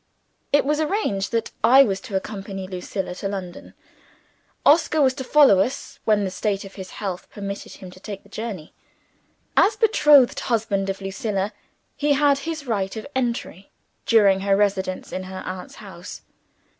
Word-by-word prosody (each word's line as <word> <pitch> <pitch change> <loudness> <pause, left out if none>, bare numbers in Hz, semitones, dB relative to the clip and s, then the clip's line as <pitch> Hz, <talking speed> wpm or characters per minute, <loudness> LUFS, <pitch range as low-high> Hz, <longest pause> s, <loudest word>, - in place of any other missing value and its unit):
It 285 0 +4
was 300 +2 +1
arranged 300 - -1
that 230 -1 -1
I 260 +4 +8
was 195 -6 -2
to 200 - -7
accompany 195 -1 -4
Lucilla 185 0 -4
to 190 +2 -4
London. 190 -3 -7 0.9
Oscar 315 +1 +4
was 265 -3 +4
to 265 0 -6
follow 270 -7 +6
us, 245 +7 -2
when 210 -2 +3
the 190 - -2
state 200 0 -2
of 195 - -11
his 190 -2 -8
health 190 -3 -5
permitted 200 -1 -7
him 185 -1 -11
to 185 - -15
take 200 0 -8
the 200 - -20
journey. 205 -7 -6 0.8
As 410 - +4
betrothed 295 - +5
husband 205 -4 -1
of 195 +1 -4
Lucilla, 195 0 -2 0.4
he 290 0 +2
had 280 0 +3
his 315 0 -5
right 200 -5 -2
of 220 - -6
entry, 235 -7 -3 0.4
during 205 -6 +5
her 195 0 +2
residence 190 -2 -1
in 185 0 -4
her 185 0 -7
aunt's 185 0 -7
house. 190 -3 -10
200 Hz, 165 wpm, -23 LUFS, 190-260 Hz, 0.9 s, I